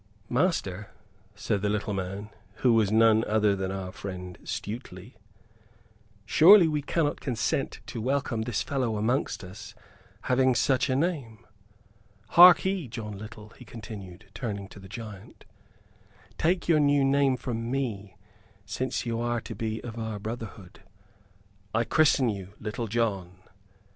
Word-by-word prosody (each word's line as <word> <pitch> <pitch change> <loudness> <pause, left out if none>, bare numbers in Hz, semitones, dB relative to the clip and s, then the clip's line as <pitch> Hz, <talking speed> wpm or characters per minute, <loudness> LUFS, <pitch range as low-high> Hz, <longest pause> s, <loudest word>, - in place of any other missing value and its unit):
"Master," 120 - 0 0.5
said 105 -1 -1
the 105 - 0
little 105 0 -1
man, 100 +2 -5 0.3
who 120 - +6
was 110 -3 +3
none 110 0 +5
other 105 -1 +2
than 95 -1 -3
our 95 -1 -5
friend 90 -2 -7
Stuteley, 105 -1 -6 1.1
"surely 175 - +7
we 150 -2 -1
cannot 150 +1 -1
consent 125 -5 -2
to 115 - -6
welcome 130 -2 -1
this 115 -1 -2
fellow 125 -6 -1
amongst 120 +4 -1
us 105 +3 -10 0.5
having 130 0 +3
such 130 +2 +2
a 130 - +1
name? 135 - -2 0.8
Harkee, 180 -1 +7
John 110 -2 -6
Little," 110 0 -10
he 125 - -15
continued, 105 -4 -10
turning 100 -4 -4
to 100 - -12
the 95 0 -13
giant, 105 -1 -10 0.9
"take 175 +3 +1
your 165 -3 +4
new 145 -1 +3
name 135 -1 +3
from 115 -2 -4
me, 105 -7 -3 0.5
since 125 +6 -3
you 115 -1 -2
are 120 0 0
to - - -7
be 110 +1 -4
of 115 -1 -7
our 110 -2 -4
brotherhood. 105 -3 -8 0.9
I 115 - +3
christen 145 -1 +3
you 100 -2 -5
Little 115 +2 -4
John!" 100 -6 -1
110 Hz, 140 wpm, -27 LUFS, 105-130 Hz, 1.1 s, surely